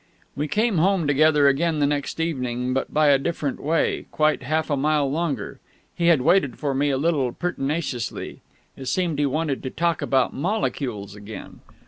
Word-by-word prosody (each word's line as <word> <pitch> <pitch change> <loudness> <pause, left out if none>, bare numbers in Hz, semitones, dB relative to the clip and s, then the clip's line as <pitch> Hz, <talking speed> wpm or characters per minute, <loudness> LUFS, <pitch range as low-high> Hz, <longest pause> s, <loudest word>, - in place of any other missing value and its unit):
We 150 +2 -2
came 210 0 +1
home 185 0 +2
together 145 0 +4
again 155 +4 +2
the 145 - +2
next 145 +1 -2
evening, 125 -6 -2
but 135 - -2
by 150 -1 +3
a 140 -1 +5
different 145 -2 -3
way, 160 +3 0
quite 155 0 +1
half 155 +4 -1
a - - +3
mile 145 0 +1
longer. 145 -8 -3 0.3
He 170 - 0
had 165 -6 +5
waited 140 -7 +3
for 145 -3 -1
me 145 +2 +1
a 135 - +1
little 140 -4 +1
pertinaciously. 145 -7 -3 0.3
It 135 - -9
seemed 170 -3 0
he 145 - +2
wanted 150 0 -1
to 130 - -4
talk 170 +2 -1
about 130 -2 +1
molecules 135 - -2
again. 105 +1 -10
145 Hz, 175 wpm, -23 LUFS, 135-165 Hz, 0.3 s, a